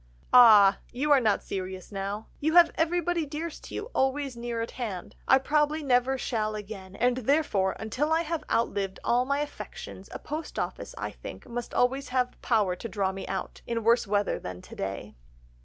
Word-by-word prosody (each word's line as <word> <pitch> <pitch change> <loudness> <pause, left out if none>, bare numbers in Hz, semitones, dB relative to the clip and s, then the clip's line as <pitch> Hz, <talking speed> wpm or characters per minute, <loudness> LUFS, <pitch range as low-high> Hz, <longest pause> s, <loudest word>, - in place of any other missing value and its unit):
"'Ah! 210 -5 +8
You 290 +4 -1
are 285 - +7
not 220 -4 +1
serious 185 0 -5
now.... 200 +2 -4
You 315 +3 0
have 345 -2 +8
everybody 345 +1 0
dearest 305 +2 -6
to - - -8
you 440 +4 -5
always 270 0 0
near 235 0 -4
at 230 - -3
hand. 210 -8 -5
I 265 - +7
probably 300 +3 +1
never 260 0 +2
shall 215 -4 -2
again; 195 -2 -8
and 245 +2 +2
therefore 250 -7 +1
until 255 +8 -2
I 325 +1 +3
have 330 -1 -3
outlived 200 -4 0
all 245 +1 +2
my 280 +2 0
affections, 295 - -8
a - - -5
post 310 +2 -6
office, - - -4
I - - -4
think, - - -10
must 240 0 -5
always 265 +3 +1
have 250 -1 -1
power 210 -6 +2
to 230 - -6
draw 195 -2 0
me 195 0 -7
out, 190 0 -5
in 230 -1 -2
worse 230 0 +3
weather 205 0 0
than 90 0 -8
to - - -11
day. 95 +2 -5
240 Hz, 190 wpm, -28 LUFS, 205-290 Hz, -, Ah